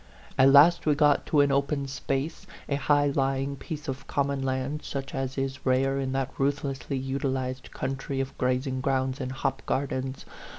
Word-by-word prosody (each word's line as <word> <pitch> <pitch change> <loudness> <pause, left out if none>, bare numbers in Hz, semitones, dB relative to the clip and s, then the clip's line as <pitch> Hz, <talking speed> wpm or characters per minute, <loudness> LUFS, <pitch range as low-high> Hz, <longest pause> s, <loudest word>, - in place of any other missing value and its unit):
At 130 +1 +6
last 155 +5 +6
we 150 - +4
got 145 -1 +3
to 150 - +4
an 140 -1 +3
open 140 0 0
space, 140 +6 -3 0.2
a - - -1
high 145 +1 +3
lying 135 0 0
piece 150 +2 -7
of 135 -1 -5
common 140 -1 0
land, 135 +3 -2
such 135 -1 -5
as 135 0 -3
is 135 0 -3
rare 135 +1 +2
in 135 -1 -2
that 135 -1 -1
ruthlessly 140 -1 -1
utilized 130 -1 -2
country 135 0 -3
of 135 0 -3
grazing 130 +1 0
grounds 130 0 0
and 130 0 -3
hop 135 0 -2
gardens. 130 -1 -2
135 Hz, 170 wpm, -27 LUFS, 130-140 Hz, 0.2 s, At